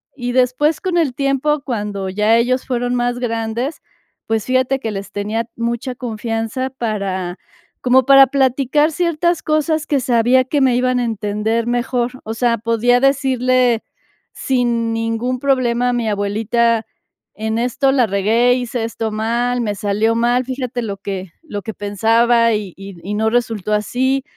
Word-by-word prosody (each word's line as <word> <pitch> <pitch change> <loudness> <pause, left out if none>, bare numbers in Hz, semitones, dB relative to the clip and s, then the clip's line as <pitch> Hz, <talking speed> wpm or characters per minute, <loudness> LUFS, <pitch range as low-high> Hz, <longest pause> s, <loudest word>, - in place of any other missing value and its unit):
Y 245 -2 -3
después, 260 +5 +2
con 365 -2 -1
el 295 -7 +1
tiempo, 275 +1 0
cuando 205 -5 -3
ya 210 +4 +2
ellos 255 +2 +1
fueron 245 -1 -1
más 245 0 -1
grandes, 230 +4 -2 0.5
pues, 225 0 -1
fíjate 260 +1 +1
que 225 - -4
les 195 -1 -6
tenía 215 +3 -2
mucha 235 +2 -3
confianza 230 +2 -3
para 195 -7 -3 0.4
como 255 0 +4
para 275 0 +8
platicar 275 +3 +2
ciertas 345 0 0
cosas 310 0 0
que 285 -3 +1
sabía 245 +1 +3
que 285 +1 0
me 255 -2 +3
iban 250 0 +1
a - - 0
entender 220 +1 -1
mejor, 245 0 0
o 220 - -4
sea, 235 0 +1
podía 230 +2 +2
decirle 255 -3 +2 0.5
sin 235 -3 0
ningún 225 +3 -1
problema 250 -3 +1
a 245 - 0
mi 235 -2 -1
abuelita: 220 +3 0 0.5
"En 220 +1 -2
esto 250 +3 +1
la 250 -5 +3
regué, 220 +5 +2
hice 245 -2 -3
esto 225 -1 -3
mal, 240 +3 -1
me 210 -3 -2
salió 210 +2 0
mal, 240 +2 +2
fíjate 255 -2 -4
lo 200 -2 -4
que 190 -3 -6
lo 205 -10 -6
que 220 - -5
pensaba 230 +3 +2
y 205 -4 -3
y 195 -2 -10
y 205 +3 -4
no 220 +1 +1
resultó 225 -4 -1
así", 260 +6 0
240 Hz, 160 wpm, -18 LUFS, 220-255 Hz, 0.5 s, para